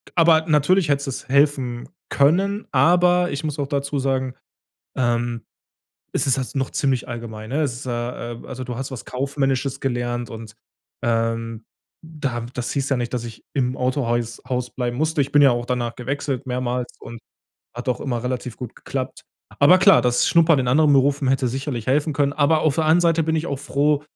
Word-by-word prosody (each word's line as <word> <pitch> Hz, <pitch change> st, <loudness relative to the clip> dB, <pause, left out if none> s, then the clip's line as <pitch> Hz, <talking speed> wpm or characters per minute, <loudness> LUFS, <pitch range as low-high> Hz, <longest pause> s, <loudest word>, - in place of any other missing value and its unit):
aber 165 Hz, -2 st, +5 dB
natürlich 155 Hz, +3 st, +3 dB
hätte 140 Hz, -1 st, 0 dB
es 130 Hz, -, -7 dB
helfen 135 Hz, -4 st, +1 dB, 0.2 s
können. 195 Hz, +9 st, +2 dB
Aber 180 Hz, +1 st, +4 dB
ich 140 Hz, +2 st, -4 dB
muss 150 Hz, -1 st, -3 dB
auch 140 Hz, -, -1 dB
dazu 140 Hz, 0 st, -2 dB
sagen, 130 Hz, -1 st, -1 dB, 0.6 s
ähm, 120 Hz, -1 st, 0 dB, 0.7 s
es -, -, 0 dB
ist 135 Hz, -2 st, +2 dB
halt 130 Hz, -, -5 dB
noch 135 Hz, -1 st, -1 dB
ziemlich 135 Hz, -4 st, 0 dB
allgemein, 110 Hz, -2 st, -7 dB
ne? 150 Hz, +3 st, +1 dB
Es 140 Hz, -5 st, 0 dB
ist 125 Hz, +3 st, -8 dB
ja, 120 Hz, -1 st, -4 dB
ähm 115 Hz, -, -9 dB
also, 130 Hz, -1 st, -6 dB
du 125 Hz, -1 st, -5 dB
hast 135 Hz, +3 st, -4 dB
was 130 Hz, -, -7 dB
Kaufmännisches 135 Hz, 0 st, -1 dB
gelernt 120 Hz, -2 st, -2 dB
und, 110 Hz, -1 st, -9 dB, 0.5 s
ähm, 115 Hz, -1 st, -1 dB, 0.4 s
da 140 Hz, -7 st, -4 dB
das 125 Hz, -1 st, -3 dB
hieß 140 Hz, -1 st, -1 dB
ja 135 Hz, -, +1 dB
nicht, 120 Hz, 0 st, -3 dB
dass 120 Hz, -1 st, -2 dB
ich 115 Hz, -2 st, -10 dB
im 130 Hz, -2 st, 0 dB
Autohäus 120 Hz, -3 st, -1 dB
Haus 125 Hz, -1 st, -2 dB
bleiben 120 Hz, -2 st, -2 dB
musste. 155 Hz, +1 st, +1 dB
Ich 140 Hz, 0 st, -2 dB
bin 145 Hz, -, +5 dB
ja 135 Hz, -, +7 dB
auch 120 Hz, 0 st, -1 dB
danach 120 Hz, -2 st, -2 dB
gewechselt 135 Hz, +1 st, -3 dB
mehrmals 125 Hz, 0 st, -3 dB
und 115 Hz, -, -9 dB, 0.6 s
hat 120 Hz, +1 st, -6 dB
auch 125 Hz, -, 0 dB
immer 120 Hz, -4 st, -2 dB
relativ 125 Hz, -1 st, -4 dB
gut 125 Hz, -3 st, -8 dB
geklappt. -, -, -5 dB, 0.4 s
Aber 175 Hz, +6 st, +7 dB
klar, 190 Hz, -1 st, +6 dB
das 125 Hz, -1 st, +2 dB
Schnuppern 165 Hz, -3 st, +5 dB
in 125 Hz, -2 st, 0 dB
anderen 150 Hz, +3 st, +4 dB
Berufen 140 Hz, 0 st, +3 dB
hätte 135 Hz, -1 st, +2 dB
sicherlich 130 Hz, -2 st, -4 dB
helfen 145 Hz, +4 st, +1 dB
können. 140 Hz, -1 st, +1 dB
Aber 155 Hz, +1 st, +3 dB
auf 155 Hz, -3 st, +2 dB
der 160 Hz, -, +1 dB
anderen 160 Hz, +3 st, +4 dB
Seite 165 Hz, -1 st, +3 dB
bin 160 Hz, +1 st, 0 dB
ich 160 Hz, +2 st, -2 dB
auch 140 Hz, -4 st, -3 dB
froh, 145 Hz, +1 st, +1 dB
135 Hz, 195 wpm, -22 LUFS, 120-145 Hz, 0.7 s, ja